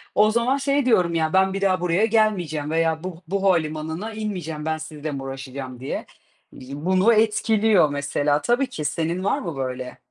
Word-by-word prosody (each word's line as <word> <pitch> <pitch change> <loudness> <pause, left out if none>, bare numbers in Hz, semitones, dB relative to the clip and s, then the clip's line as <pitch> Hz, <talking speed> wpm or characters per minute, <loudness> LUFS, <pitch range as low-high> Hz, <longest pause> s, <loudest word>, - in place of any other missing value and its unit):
O 215 +1 +5
zaman 240 +4 +1
şey 275 -1 +1
diyorum 180 -8 +3
ya 160 0 0
"Ben 190 0 +3
bir 195 - -3
daha 185 -2 +2
buraya 180 +5 +2
gelmeyeceğim 180 -10 0
veya 160 0 +1
bu 180 -2 -6
bu 195 +2 -2
havalimanına 160 +3 0
inmeyeceğim, 175 -8 -4
ben 160 0 -1
sizle 155 -1 -6
mi 135 -1 -5
uğraşacağım." 135 -1 -7
diye. 135 - -4 0.5
Eee, 130 - -12
bunu 185 +9 +3
etkiliyor 215 -5 +3
mesela 145 +1 0
tabii 245 +3 +1
ki, 155 - -6
senin 170 +4 -1
var 200 - +1
mı 170 -6 -5
böyle? 130 -1 -4
170 Hz, 180 wpm, -23 LUFS, 150-210 Hz, 0.5 s, O